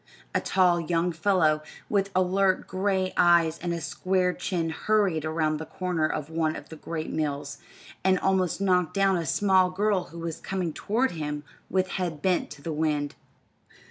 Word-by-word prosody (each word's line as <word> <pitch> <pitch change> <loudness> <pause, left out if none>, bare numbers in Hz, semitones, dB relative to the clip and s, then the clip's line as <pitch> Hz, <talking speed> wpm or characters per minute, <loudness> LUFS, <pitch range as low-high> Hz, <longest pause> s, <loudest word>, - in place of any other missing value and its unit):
A - - +1
tall 180 -2 +3
young 170 +1 0
fellow, 165 -3 +2 0.3
with 200 -1 +1
alert 185 +1 +2
gray 190 -1 0
eyes 170 -2 +4
and 175 0 -3
a 170 - -2
square 180 +3 0
chin 170 -4 -2
hurried 185 -3 +1
around 155 -1 0
the 160 - -6
corner 180 -4 -1
of 150 -1 -3
one 160 -1 -1
of - - -9
the 160 - -8
great 160 0 -5
mills, 145 -2 -3 0.4
and 190 0 +4
almost 190 -2 +1
knocked 180 -3 +2
down 195 -1 +3
a 170 -3 -2
small 190 +2 +3
girl 195 0 +1
who 170 - -12
was 165 -1 -5
coming 185 -4 -3
toward 240 +10 0
him 150 -3 -4 0.3
with 185 -1 +1
head 175 -5 -3
bent 185 -2 +1
to 145 -1 -11
the 165 - -3
wind. 150 -2 0
175 Hz, 175 wpm, -27 LUFS, 160-190 Hz, 0.4 s, eyes